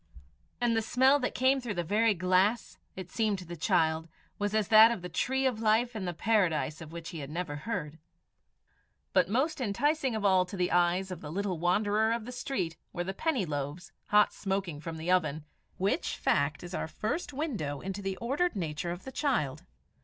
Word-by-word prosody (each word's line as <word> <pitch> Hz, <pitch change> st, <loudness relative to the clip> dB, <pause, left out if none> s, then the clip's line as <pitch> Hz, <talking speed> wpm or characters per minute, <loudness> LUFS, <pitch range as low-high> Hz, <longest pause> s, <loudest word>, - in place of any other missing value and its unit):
And 240 Hz, -2 st, +2 dB
the 225 Hz, -, +2 dB
smell 260 Hz, +5 st, +4 dB
that 250 Hz, -, -2 dB
came 265 Hz, +1 st, +3 dB
through 230 Hz, -5 st, -4 dB
the 175 Hz, -, -1 dB
very 210 Hz, +5 st, +2 dB
glass, 185 Hz, +5 st, +1 dB, 0.2 s
it 185 Hz, -1 st, -8 dB
seemed 215 Hz, -3 st, +1 dB
to 185 Hz, -, -9 dB
the 175 Hz, +1 st, -7 dB
child, 160 Hz, 0 st, +1 dB, 0.3 s
was 205 Hz, +1 st, -1 dB
as 215 Hz, -2 st, +1 dB
that 220 Hz, 0 st, +9 dB
of 230 Hz, -7 st, -3 dB
the 180 Hz, -, -5 dB
tree 265 Hz, +9 st, 0 dB
of 250 Hz, -4 st, +1 dB
life 225 Hz, +2 st, +2 dB
in 205 Hz, -3 st, -3 dB
the 175 Hz, -, -1 dB
Paradise 170 Hz, -7 st, +1 dB
of 160 Hz, -1 st, -9 dB
which 165 Hz, -1 st, -7 dB
he 165 Hz, -, -7 dB
had 140 Hz, -1 st, -6 dB
never 160 Hz, -1 st, -4 dB
heard. 150 Hz, -2 st, -4 dB, 1.1 s
But 185 Hz, -2 st, +3 dB
most 265 Hz, +7 st, 0 dB
enticing 265 Hz, +4 st, +1 dB
of 215 Hz, -2 st, -2 dB
all 190 Hz, -2 st, +5 dB
to 195 Hz, -, -7 dB
the 180 Hz, -1 st, 0 dB
eyes 180 Hz, +2 st, +2 dB
of 180 Hz, -, -6 dB
the 150 Hz, -, -7 dB
little 190 Hz, -1 st, -2 dB
wanderer 205 Hz, +5 st, +2 dB
of 230 Hz, -2 st, -3 dB
the 250 Hz, -, -6 dB
street 220 Hz, -, -3 dB
were 175 Hz, -, -3 dB
the 190 Hz, +2 st, -4 dB
penny 265 Hz, -, 0 dB
loaves, 145 Hz, +3 st, -4 dB, 0.2 s
hot 210 Hz, 0 st, +4 dB
smoking 190 Hz, -6 st, -3 dB
from 165 Hz, 0 st, -6 dB
the 165 Hz, +3 st, -2 dB
oven 155 Hz, -4 st, +1 dB, 0.3 s
which 195 Hz, +2 st, 0 dB
fact 145 Hz, +2 st, +1 dB
is 175 Hz, +1 st, -8 dB
our -, -, -2 dB
first 220 Hz, -, -3 dB
window 220 Hz, -, -3 dB
into 195 Hz, +1 st, -5 dB
the 195 Hz, -1 st, -3 dB
ordered 285 Hz, +9 st, 0 dB
nature 165 Hz, -2 st, -3 dB
of 175 Hz, +1 st, -5 dB
the 265 Hz, -, -7 dB
child. 180 Hz, -, -1 dB
190 Hz, 205 wpm, -30 LUFS, 170-230 Hz, 1.1 s, that